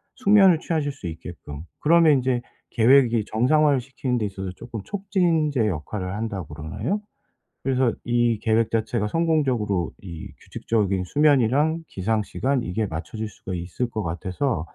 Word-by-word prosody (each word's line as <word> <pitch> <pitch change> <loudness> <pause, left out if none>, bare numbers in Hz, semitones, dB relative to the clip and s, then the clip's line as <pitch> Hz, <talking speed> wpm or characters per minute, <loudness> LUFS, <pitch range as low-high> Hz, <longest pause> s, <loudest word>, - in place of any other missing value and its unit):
숙면을 200 -8 +5
취하실 155 -4 -1
수 135 -10 -8
있게끔 80 -3 -8 0.2
그러면 165 0 +5
인제 130 -2 +1 0.3
계획이 120 -2 +4
정상화를 140 +5 +3
시키는 130 0 -3
데 110 - -1
있어서 95 -2 -5
쪼끔 115 -1 -7
'촉진제 170 - +1
역할을 90 +2 -4
한다.' 105 -3 -3
그러나요? 80 - -4 0.6
그래서 130 -3 +1
이 120 -2 +2
계획 110 0 +2
자체가 110 -1 0
성공적으로 130 - 0
이 85 -5 -8
규칙적인 100 -4 -1
수면이랑 145 - +2
기상 110 +1 -1
시간 135 +4 -1
이게 105 +3 -1
맞춰질 95 +6 -5
수가 95 -1 -8
있을 90 +8 -3
것 110 -2 -4
같아서 90 - -2
115 Hz, 340 characters per minute, -24 LUFS, 95-145 Hz, 0.6 s, 숙면을